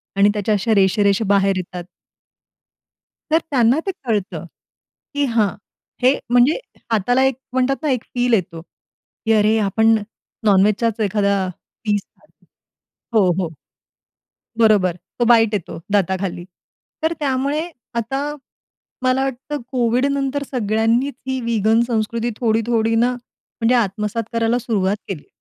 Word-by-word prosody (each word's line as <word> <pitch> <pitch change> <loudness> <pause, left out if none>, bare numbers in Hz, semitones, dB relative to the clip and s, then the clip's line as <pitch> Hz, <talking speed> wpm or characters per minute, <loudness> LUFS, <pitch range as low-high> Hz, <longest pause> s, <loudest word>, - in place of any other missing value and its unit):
आणि 200 +1 +5
त्याच्या 210 0 0
अशा 220 +3 +1
रेषा-रेषा 200 +2 +3
बाहेर 195 -1 +3
येतात. 180 -1 -5 1.5
तर 320 - +5
त्यांना 250 +2 +3
ते - - +2
कळतं, 215 -5 -2 0.7
की 285 0 0
हां, 230 -5 +2 0.5
हे 255 - +6 0.2
म्हणजे 245 +5 +5 0.4
हाताला 245 +5 +2
एक 265 -2 +1 0.2
म्हणतात 260 +1 +2
ना 305 - +1
एक 250 -3 -1
फील 245 0 +1
येतो, 165 -6 0
की 225 +5 -6
अरे, 215 +1 +3
आपण 220 +2 +3 0.5
नॉनवेजचाच 210 +3 +3
एखादा 200 0 +1 0.5
पिस 205 -2 +1
खातोय. - - -30 0.7
हो, 185 -3 +4
हो. 165 - -3 1.1
बरोबर. 210 -6 +4 0.2
तो 240 - +3
बाईट 225 -2 +5
येतो 170 -4 -3
दाताखाली. 190 -2 0 0.6
तर 320 - +2
त्यामुळे 285 +3 -1 0.3
आता, 270 +6 -2 0.7
मला 255 +1 +2
वाटतं 270 +2 -4
कोव्हिडनंतर 270 +3 0
सगळ्यांनीच 230 +3 +1
ही 260 0 -1
विगन 225 0 +2
संस्कृती 230 +1 -1
थोडी, 225 -2 +2
थोडी 225 -1 +1
ना 240 +2 +3
म्हणजे 245 0 -3
आत्मसात 210 0 0
करायला 230 +1 +1
सुरुवात 205 -4 0
केली. 175 -7 -6
225 Hz, 125 wpm, -20 LUFS, 205-250 Hz, 1.5 s, हे